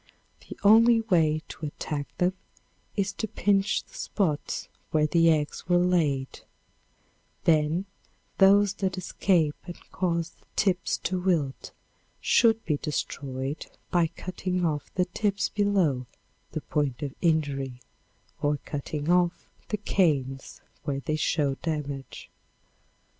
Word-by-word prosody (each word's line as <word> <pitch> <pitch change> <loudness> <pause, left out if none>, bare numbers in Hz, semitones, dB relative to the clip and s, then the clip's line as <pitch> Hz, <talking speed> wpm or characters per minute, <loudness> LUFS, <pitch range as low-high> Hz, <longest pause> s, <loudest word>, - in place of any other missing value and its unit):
The - - -7
only 225 +3 +7
way 160 -7 +2
to 155 - -5
attack 145 0 -4
them 180 +1 +2 0.6
is 195 -1 0
to 220 - -3
pinch 200 -1 +1
the - - -25
spots 160 -8 -2 0.2
where 155 -1 +3
the 165 +1 +4
eggs 155 +2 0
were 175 - +5
laid; 160 -7 +1 1.0
then 160 +3 +2 0.5
those 200 0 +6
that 190 -1 0
escape 175 -3 +1
and 175 - -7
cause 170 -2 -1
the - - -31
tips 190 -2 +1
to 185 -1 0
wilt 165 -7 0 0.5
should 225 -1 +3
be 150 -2 +1
destroyed 140 -1 -4 0.2
by 175 -2 +3
cutting 180 +1 -3
off 150 -3 -2
the 180 - +2
tips 200 +2 -1
below 185 -12 +1 0.5
the - - -2
point 145 -3 -1
of 140 -2 -3
injury 140 -6 0 0.6
or 145 0 +2
cutting 145 +1 -4
off 175 -1 +2 0.2
the 210 - 0
canes 140 -10 0 0.2
when 140 -2 -3
they 155 - 0
show 150 -2 +1
damage. 145 -5 -4
165 Hz, 125 wpm, -27 LUFS, 145-185 Hz, 1.0 s, only